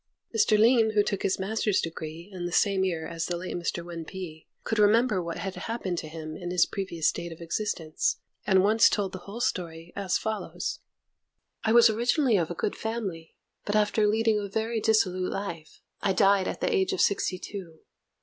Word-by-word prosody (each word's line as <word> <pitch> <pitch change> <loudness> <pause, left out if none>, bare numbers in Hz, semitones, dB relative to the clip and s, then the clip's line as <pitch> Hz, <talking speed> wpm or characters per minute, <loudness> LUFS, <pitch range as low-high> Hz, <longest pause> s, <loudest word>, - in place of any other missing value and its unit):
Mr. 215 0 +4
Lin, 225 0 +5
who 205 - +5
took 200 -1 -2
his 190 - +1
master's 210 +1 0
degree 165 +1 -5
in 175 -1 -4
the - - -6
same 195 +1 +3
year 170 -4 -1
as 165 -1 -3
the 175 - -2
late 180 +2 -5
Mr. 170 0 -3
Wên 170 -1 -6
Pi, 160 -2 -8 0.2
could 220 - -1
remember 210 -1 +4
what 170 -1 -4
had 195 -1 -4
happened 190 -7 -3
to 155 - -7
him 155 0 -7
in 175 +1 -6
his 180 -1 +4
previous 170 -5 -2
state 170 0 -2
of 165 - -10
existence, 170 -2 -1 0.3
and 190 -1 +5
once 215 +3 +5
told 200 -3 -1
the 185 - -7
whole 220 +4 -6
story, 170 -6 -3
as 195 -2 0
follows: 220 -1 -3 0.8
I 220 - +2
was 235 0 +8
originally 240 +3 +2
of 170 -5 +1
a 175 - -4
good 200 - -2
family, 200 -8 -4 0.3
but, 205 - -2
after 210 0 +3
leading 220 0 +2
a 205 - -4
very 220 +3 -1
dissolute 185 -5 +2
life, 170 -6 -6 0.2
I 195 - +2
died 195 0 +4
at - - -4
the - - +1
age 385 0 +1
of 385 - 0
sixty 190 -2 +1
two. 180 -4 -8
195 Hz, 200 wpm, -27 LUFS, 170-215 Hz, 0.8 s, was